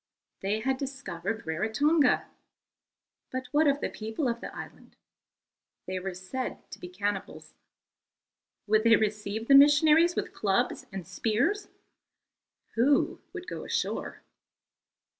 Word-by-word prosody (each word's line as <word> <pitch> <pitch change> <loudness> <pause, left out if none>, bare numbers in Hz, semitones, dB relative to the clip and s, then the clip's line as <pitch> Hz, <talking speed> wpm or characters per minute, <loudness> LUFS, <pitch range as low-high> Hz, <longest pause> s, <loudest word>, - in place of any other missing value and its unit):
They 205 +3 -1
had 265 +2 0
discovered 225 -7 -5
Rarotonga. 245 - +2 1.1
But 260 0 -3
what 300 +1 +4
of 280 0 +2
the - - -1
people 220 +6 -3
of 235 0 -2
the - - -5
island? - - -11 0.9
They 185 0 -3
were 185 0 -5
said 210 +8 -5
to - - -9
be 180 - -8
cannibals. 200 +2 -4 1.1
Would 215 +1 +3
they 230 -1 +7
receive 215 +1 -2
the 275 - +5
missionaries 300 +4 +6
with - - -3
clubs 195 -2 0
and 190 -2 -6
spears? 245 - 0 1.1
Who 270 +5 +2
would 365 -2 -8
go - - -6
ashore? - - -3
225 Hz, 120 wpm, -28 LUFS, 205-280 Hz, 1.1 s, they